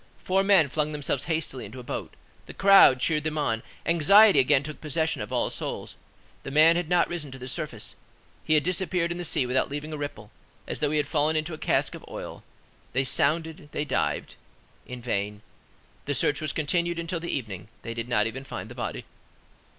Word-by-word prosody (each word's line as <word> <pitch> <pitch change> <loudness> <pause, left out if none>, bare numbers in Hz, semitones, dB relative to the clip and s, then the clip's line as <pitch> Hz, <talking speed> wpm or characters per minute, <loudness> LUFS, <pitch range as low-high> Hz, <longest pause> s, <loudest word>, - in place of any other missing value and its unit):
Four 190 +1 +1
men 195 -6 +5
flung 150 +2 -1
themselves 145 -3 -2
hastily 160 -6 -2
into 130 - -9
a - - -8
boat; - - -6 0.3
the - - -10
crowd 195 -9 +7
cheered 150 +2 +1
them 155 0 -2
on; 115 -7 0 0.2
anxiety 200 +6 +6
again 135 +1 +4
took 155 +1 -8
possession 160 +1 -1
of - - -6
all - - 0
souls; - - -4 0.5
the - - -7
man 155 +4 +6
had 175 -2 -2
not 175 -1 +3
risen 165 -4 -4
to 135 - -9
the 130 0 -8
surface; 125 - -4 0.5
he 155 - +2
had 150 - +3
disappeared 180 -1 0
in 175 - -4
the - - -3
sea 150 -5 +2
without 125 +1 0
leaving 145 +2 -5
a - - -4
ripple, 145 0 -6 0.3
as - - -5
though 150 - +1
he 155 - 0
had 150 - +1
fallen 150 +2 +1
into 155 +2 -1
a - - -5
cask - - +1
of - - -9
oil: - - -7 0.5
they 130 +2 +2
sounded, 155 +3 0
they 145 - -2
dived. - - -1 0.5
In 125 -1 -8
vain. 105 -2 -2 0.6
The 145 - -1
search 145 +3 +2
was 155 -3 -1
continued 170 +3 0
until 170 +1 -3
the 170 - -6
evening: 105 -7 -4 0.2
they 115 - -5
did 115 +1 -5
not 105 -3 +2
even 125 +4 -4
find 135 - -7
the - - -8
body. - - -5
150 Hz, 205 wpm, -26 LUFS, 130-165 Hz, 0.6 s, crowd